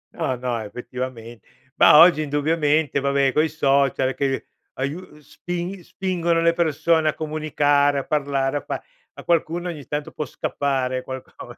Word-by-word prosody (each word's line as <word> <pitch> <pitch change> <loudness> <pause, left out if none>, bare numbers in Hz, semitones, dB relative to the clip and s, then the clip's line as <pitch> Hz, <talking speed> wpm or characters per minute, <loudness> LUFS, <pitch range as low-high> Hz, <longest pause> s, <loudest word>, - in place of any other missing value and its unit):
No, 130 - -1
no, 125 -1 -3
effettivamen 120 +1 -7 0.4
Mah, - - +7
oggi 170 -2 +7
indubbiamente, 150 0 +1
va 140 0 0
beh 140 -1 +2
coi 155 +1 +2
social, 140 -3 +1
che 135 -1 -1 0.3
aiu 140 +6 -3
uhm, 180 -5 -15
spin 175 +5 -6
spingono 170 -3 -1
le 170 0 +3
persone 160 -1 +2
a - - -2
comunicare, 145 -2 +1
a - - -4
parlare, 140 -2 0
a - - -4
fa. - - -4 0.3
A - - -10
qualcuno 170 +1 0
ogni 150 -5 -7
tanto 150 0 -4
può 150 - -4
scappare 130 -4 -2
qualcosa, 130 0 -9
145 Hz, 155 wpm, -22 LUFS, 135-160 Hz, 0.4 s, Mah